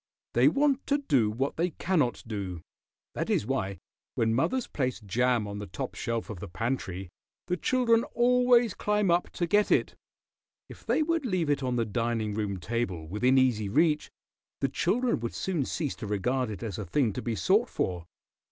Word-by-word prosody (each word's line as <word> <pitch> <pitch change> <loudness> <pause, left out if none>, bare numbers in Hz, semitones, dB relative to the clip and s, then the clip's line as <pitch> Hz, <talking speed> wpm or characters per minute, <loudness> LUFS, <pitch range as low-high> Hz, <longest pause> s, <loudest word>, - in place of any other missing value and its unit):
They 120 +3 +5
want 275 - +2
to 285 - +3
do 135 - +2
what 130 +6 -2
they 175 +2 +1
cannot 155 - 0
do. 100 -6 -5 0.5
That - - -3
is - - +1
why, 100 -7 -2 0.4
when 115 0 +2
mothers 245 - +1
place 130 -3 -2
jam 115 +2 +1
on 100 0 -5
the 105 - -6
top 90 - -5
shelf 115 -1 -3
of 100 - -7
the 105 - -6
pantry, 95 -2 -3 0.4
the 180 - 0
children 235 +3 +2
always 245 -1 +4
climb 210 -3 +1
up 175 +1 +2
to 175 - -1
get 205 +4 +3
it. - - +2 0.7
If - - -14
they 315 - +3
would 335 0 0
leave 185 - 0
it 145 - 0
on 125 -2 -1
the 115 -1 +1
dining 115 -1 -1
room 100 -3 -2
table, 95 -7 -3
within 125 +9 +2
easy 120 -6 +2
reach, 150 +5 +2 0.5
the 135 - +1
children 230 - +1
would 115 0 -4
soon 170 -8 -1
cease 150 -1 -2
to 110 - -6
regard 120 +5 0
it 105 -2 -6
as 105 -5 -4
a 105 - -4
thing 110 +4 +1
to - - -4
be 115 -2 -2
sought 90 - +2
for. 90 -2 -2
125 Hz, 190 wpm, -28 LUFS, -, 0.7 s, They